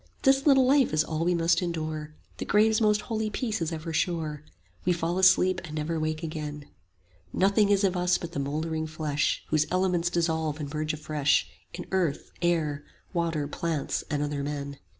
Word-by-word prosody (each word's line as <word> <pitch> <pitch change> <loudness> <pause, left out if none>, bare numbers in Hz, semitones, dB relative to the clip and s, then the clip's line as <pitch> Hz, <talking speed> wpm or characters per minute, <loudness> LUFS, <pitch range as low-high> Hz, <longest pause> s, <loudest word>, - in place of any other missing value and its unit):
This 270 +1 +4
little 270 -2 +6
life 270 - +4
is 155 0 +3
all 160 +1 -2
we 175 +1 +2
must 170 +2 +2
endure, 155 -3 -4 0.2
The - - -3
grave's 215 +2 +3
most 210 -1 +3
holy 220 -2 -2
peace 220 -1 -2
is 165 0 -1
ever 160 0 -5
sure, 160 -3 -1
50 - - -24 0.3
We 180 - +3
fall 170 +2 -1
asleep 185 0 +4
and 155 -3 -7
never 160 +2 -2
wake 155 +1 -2
again; 150 -2 -5 0.7
Nothing 200 - +3
is 200 0 +3
of 190 -2 +2
us 180 0 +2
but 170 - -7
the 170 - -4
mouldering 155 +3 -2
flesh, 155 -2 -1
Whose 155 -1 +2
elements 180 -2 +1
dissolve 160 -3 -1
and 145 -1 -5
merge 155 0 -1
afresh 150 -2 +1 0.3
In - - -6
earth, 175 -7 -1
air, 155 -4 0 0.3
water, 165 -4 -1
plants, 160 0 -2
and 145 -1 0
other 145 -1 -2
men. 140 -1 -4
165 Hz, 185 wpm, -27 LUFS, 155-185 Hz, 0.7 s, little